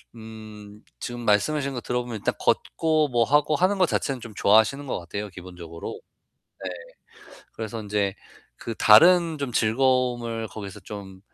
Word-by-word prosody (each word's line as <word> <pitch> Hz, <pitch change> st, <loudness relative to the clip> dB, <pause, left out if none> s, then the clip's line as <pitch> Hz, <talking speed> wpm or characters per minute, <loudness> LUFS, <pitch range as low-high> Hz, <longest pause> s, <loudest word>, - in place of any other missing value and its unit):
음 110 Hz, -2 st, -11 dB, 0.2 s
지금 120 Hz, 0 st, -6 dB
말씀하신 135 Hz, +7 st, +1 dB
거 125 Hz, -, -4 dB
들어보면 125 Hz, -2 st, -3 dB
일단 -, -, -1 dB
걷고 155 Hz, -2 st, +1 dB
뭐 120 Hz, -2 st, +2 dB
하고 145 Hz, +4 st, +2 dB
하는 190 Hz, +4 st, +2 dB
것 185 Hz, -, +3 dB
자체는 135 Hz, -5 st, -1 dB
좀 115 Hz, -2 st, -9 dB
좋아하시는 110 Hz, +7 st, +3 dB
것 125 Hz, -, -2 dB
같아요, 100 Hz, +5 st, -6 dB
기본적으로. 90 Hz, -3 st, -9 dB, 1.3 s
네. -, -, -17 dB
그래서 110 Hz, 0 st, -6 dB
인제 100 Hz, -2 st, -1 dB, 0.4 s
그 115 Hz, -, -6 dB
다른 165 Hz, +8 st, +6 dB
좀 135 Hz, -4 st, -4 dB
즐거움을 120 Hz, -1 st, +1 dB
거기서 100 Hz, -1 st, -8 dB
좀 95 Hz, -1 st, -9 dB
115 Hz, 305 characters per minute, -25 LUFS, 105-135 Hz, 1.3 s, 다른